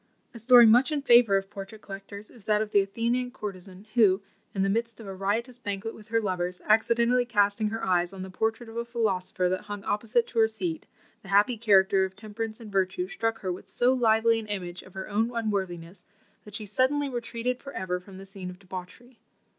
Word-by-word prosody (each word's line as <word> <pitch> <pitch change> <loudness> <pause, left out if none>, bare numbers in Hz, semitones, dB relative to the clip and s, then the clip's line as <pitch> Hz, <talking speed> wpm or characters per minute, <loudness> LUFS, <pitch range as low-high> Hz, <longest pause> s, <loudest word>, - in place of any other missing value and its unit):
A 235 - -8
story 240 +1 +8
much 245 +6 +5
in 290 -2 -1
favour 235 -6 +6
of 195 0 -5
portrait 200 +1 -9
collectors 200 +1 -9
is 225 -4 -16
that 210 -1 +2
of 215 -1 -2
the 205 - +5
Athenian 235 +5 -1
courtesan, 195 -4 -8
who, 205 -4 +4 0.3
in 195 - -1
the - - +2
midst 230 +1 -1
of 225 - -10
a 195 - -6
riotous 225 +6 -2
banquet 205 0 -4
with 210 - -14
her 230 0 +1
lovers, 180 -3 -2
accidentally 235 +3 +3
casting 210 -2 +2
her 225 +2 -3
eyes 175 -1 +1
on 190 -1 -7
the 190 - -8
portrait 225 +4 -2
of 225 +1 -9
a 235 - -1
philosopher 195 -6 -1
that 185 +3 -2
hung 205 -1 -6
opposite 230 +2 +1
to 230 - -3
her 220 - +6
seat, 320 +9 -4 0.3
the 195 - -9
happy 205 +5 +4
character 195 -3 +4
of 190 0 -4
temperance 215 +2 -6
and 220 -3 -10
virtue 195 - 0
struck 225 -13 -2
her 185 - -2
with 180 - -11
so 245 +1 +2
lively 230 -2 +3
an 220 - -8
image 185 -3 -4
of 185 - -17
her 190 - -5
own 220 +3 0
unworthiness, 190 -5 -3 0.4
that 210 -1 -10
she 215 - -4
suddenly 260 +7 +1
retreated 240 0 -3
for 275 - -8
ever 180 -1 -2
from 185 +1 -13
the 195 - -10
scene 195 -2 -8
of 180 - -10
debauchery. 195 +6 -10
210 Hz, 215 wpm, -27 LUFS, 195-235 Hz, 0.4 s, story